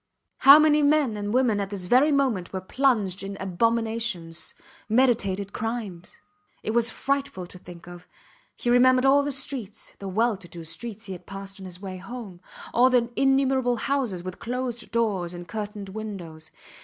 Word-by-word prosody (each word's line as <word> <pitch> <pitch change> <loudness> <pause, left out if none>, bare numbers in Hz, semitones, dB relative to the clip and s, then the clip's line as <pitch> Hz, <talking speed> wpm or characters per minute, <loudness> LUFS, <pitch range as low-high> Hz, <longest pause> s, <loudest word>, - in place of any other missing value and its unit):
How 275 +2 +10
many 305 -1 +4
men 290 -5 +3
and 205 0 -3
women 240 -4 +2
at 200 -1 -2
this 195 -3 -5
very 255 +10 +4
moment 255 -11 +1
were 190 - -3
plunged 205 -3 +1
in 195 0 -6
abominations 220 -3 -1 0.3
meditated 210 -5 +2
crimes. 215 -6 -5 0.5
It - - -1
was 235 +1 +3
frightful 275 -7 -2
to 180 +1 -10
think 175 -1 -12
of. 175 0 -11 0.5
He 240 - 0
remembered 255 +1 +5
all 275 +1 +6
the 285 0 -2
streets 260 -6 -4
the 195 - -6
well 220 +3 +1
to 185 - -13
do 170 0 -9
streets 220 +6 -7
he 195 - -5
had 180 - -11
passed 195 0 -8
on 190 - -9
his 180 -1 -10
way 190 -1 -6
home; 195 -2 -9 0.3
all 250 +2 +5
the 245 -2 +2
innumerable 270 -2 +2
houses 240 -8 -1
with 185 0 -7
closed 245 0 -4
doors 200 -7 -1
and 175 0 -9
curtained 210 0 -5
windows. 190 -7 -7
220 Hz, 170 wpm, -25 LUFS, 190-250 Hz, 0.5 s, How